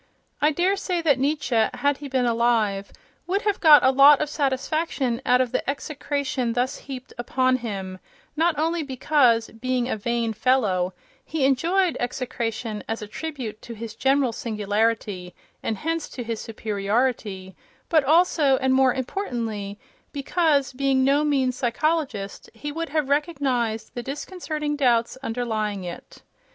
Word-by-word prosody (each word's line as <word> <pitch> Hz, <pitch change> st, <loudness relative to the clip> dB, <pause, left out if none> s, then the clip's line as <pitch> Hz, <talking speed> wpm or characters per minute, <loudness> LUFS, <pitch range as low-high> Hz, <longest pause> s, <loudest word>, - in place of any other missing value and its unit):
I 300 Hz, -, +5 dB
daresay 360 Hz, +1 st, 0 dB
that 285 Hz, -5 st, +3 dB
Nietzsche, 270 Hz, -5 st, +1 dB
had 285 Hz, -1 st, +1 dB
he 285 Hz, -, -7 dB
been 260 Hz, -2 st, 0 dB
alive, 225 Hz, -4 st, +1 dB, 0.4 s
would 390 Hz, +3 st, 0 dB
have 415 Hz, -2 st, 0 dB
got 305 Hz, -3 st, +8 dB
a 260 Hz, -, +6 dB
lot 275 Hz, +2 st, +7 dB
of 300 Hz, -1 st, -2 dB
satisfaction 275 Hz, -3 st, -1 dB
out 250 Hz, +1 st, +5 dB
of 250 Hz, -2 st, -1 dB
the -, -, -1 dB
execration 280 Hz, -3 st, -2 dB
thus 250 Hz, +3 st, 0 dB
heaped 260 Hz, -2 st, -9 dB
upon 255 Hz, +1 st, +1 dB
him, 195 Hz, -6 st, -5 dB, 0.4 s
not 325 Hz, 0 st, +2 dB
only 330 Hz, +2 st, 0 dB
because, 260 Hz, -4 st, +2 dB
being 250 Hz, +1 st, -1 dB
a -, -, -1 dB
vain 230 Hz, +1 st, -1 dB
fellow, 200 Hz, -7 st, +1 dB, 0.3 s
he 305 Hz, -3 st, -1 dB
enjoyed 340 Hz, +7 st, +2 dB
execration 235 Hz, -3 st, -3 dB
as 225 Hz, -1 st, -3 dB
a -, -, -7 dB
tribute 250 Hz, -4 st, -6 dB
to 235 Hz, -, -9 dB
his 225 Hz, 0 st, -7 dB
general 270 Hz, +1 st, +2 dB
singularity, 210 Hz, -4 st, -1 dB, 0.3 s
and 220 Hz, -, -2 dB
hence 325 Hz, +5 st, -2 dB
to 245 Hz, -, -6 dB
his 230 Hz, -1 st, -4 dB
superiority, 210 Hz, -2 st, -2 dB, 0.3 s
but 315 Hz, -4 st, +3 dB
also 305 Hz, -2 st, +4 dB
and 260 Hz, 0 st, +1 dB
more 260 Hz, -1 st, +4 dB
importantly 230 Hz, -, -3 dB, 0.3 s
because, 285 Hz, -1 st, +1 dB
being 265 Hz, 0 st, +2 dB
no 280 Hz, +3 st, +3 dB
mean 275 Hz, -4 st, +2 dB
psychologist, 255 Hz, -4 st, -2 dB
he 295 Hz, +6 st, -5 dB
would 330 Hz, +2 st, -4 dB
have 305 Hz, -1 st, 0 dB
recognized 270 Hz, -7 st, -1 dB
the 240 Hz, -, -4 dB
disconcerting 300 Hz, +2 st, -4 dB
doubts 240 Hz, -5 st, +2 dB
underlying 220 Hz, -5 st, -2 dB
it. 175 Hz, -1 st, -9 dB
260 Hz, 145 wpm, -24 LUFS, 225-295 Hz, 0.4 s, got